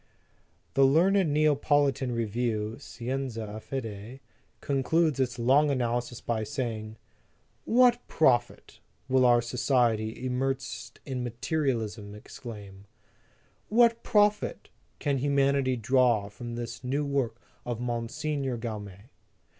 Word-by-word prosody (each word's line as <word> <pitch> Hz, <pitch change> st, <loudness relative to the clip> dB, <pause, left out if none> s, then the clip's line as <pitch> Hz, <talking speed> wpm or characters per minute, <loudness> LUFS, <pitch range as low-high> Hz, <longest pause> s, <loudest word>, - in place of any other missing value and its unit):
The 135 Hz, -, +4 dB
learned 170 Hz, +5 st, +4 dB
Neapolitan 145 Hz, -3 st, +2 dB
review, 115 Hz, -1 st, -2 dB
Scienza 120 Hz, -5 st, -5 dB
e -, -, -5 dB
Fede, 115 Hz, -1 st, -6 dB, 0.4 s
concludes 145 Hz, +2 st, +1 dB
its 125 Hz, -2 st, 0 dB
long 135 Hz, +5 st, +4 dB
analysis 120 Hz, -2 st, -1 dB
by 110 Hz, -2 st, -1 dB
saying, 110 Hz, -2 st, -4 dB, 0.7 s
"What 245 Hz, 0 st, +4 dB
profit," 120 Hz, -6 st, +1 dB, 0.3 s
will 130 Hz, -1 st, +3 dB
our 120 Hz, -1 st, +4 dB
society, 120 Hz, -2 st, 0 dB
immersed 130 Hz, -3 st, -3 dB
in 130 Hz, -3 st, -3 dB
materialism, 115 Hz, -5 st, -2 dB
exclaim, 100 Hz, -3 st, -10 dB, 0.8 s
"what 230 Hz, +1 st, +4 dB
profit 210 Hz, 0 st, +1 dB, 0.3 s
can 140 Hz, -3 st, 0 dB
human 140 Hz, 0 st, +2 dB
ity 130 Hz, -2 st, +1 dB
draw 120 Hz, -3 st, +2 dB
from 120 Hz, +3 st, -7 dB
this 120 Hz, +1 st, -6 dB
new 140 Hz, +4 st, -1 dB
work 130 Hz, -5 st, -1 dB, 0.2 s
of 120 Hz, -2 st, -4 dB
MOT. 120 Hz, -1 st, -2 dB
Gaume? 120 Hz, -, -4 dB
125 Hz, 105 wpm, -28 LUFS, 115-140 Hz, 0.8 s, The